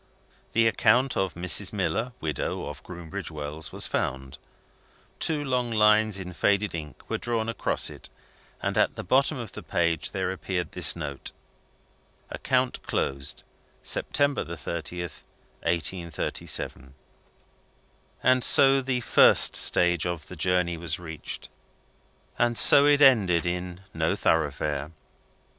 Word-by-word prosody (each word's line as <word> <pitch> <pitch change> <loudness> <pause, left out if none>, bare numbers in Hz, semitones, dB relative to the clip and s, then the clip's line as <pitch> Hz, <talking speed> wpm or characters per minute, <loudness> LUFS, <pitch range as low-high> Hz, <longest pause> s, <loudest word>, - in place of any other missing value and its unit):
The 115 +1 +3
account 120 +4 +3
of 95 -2 -1
Mrs. 85 -1 0
Miller, 120 +3 -1
widow, 75 -7 -3
of - - -8
Groombridge 85 -3 -7
Wells, 75 0 -6
was - - -1
found. 65 0 -3 0.8
Two 155 -2 -1
long 125 -3 -1
lines, 105 -1 +3
in 90 -1 -7
faded 100 +2 +1
ink, 75 -3 -8
were - - -3
drawn 115 -2 -2
across 115 - 0
it; - - -11 0.5
and - - 0
at - - +2
the - - -6
bottom 135 - +2
of 115 -5 -6
the - - -8
page 85 -2 -1
there 95 -2 -2
appeared 95 -1 -4
this - - +2
note: 70 -5 -6 1.0
"Account - - -1
closed, 70 0 -3 0.4
September 140 0 0
30th, 85 0 -6 0.4
1837." 85 -6 -3 1.5
So 135 +2 +5
the 130 -1 -1
first - - +6
stage 85 -1 +3
of 85 -3 -5
the 90 - -8
journey 90 0 0
was 80 0 -3
reached 80 -3 -7 0.9
and 120 -1 +2
so 140 0 +6
it 145 0 +4
ended 100 - +5
in 90 +1 -4
No - - 0
Thoroughfare! 75 -1 -1
90 Hz, 125 wpm, -26 LUFS, 80-115 Hz, 1.5 s, first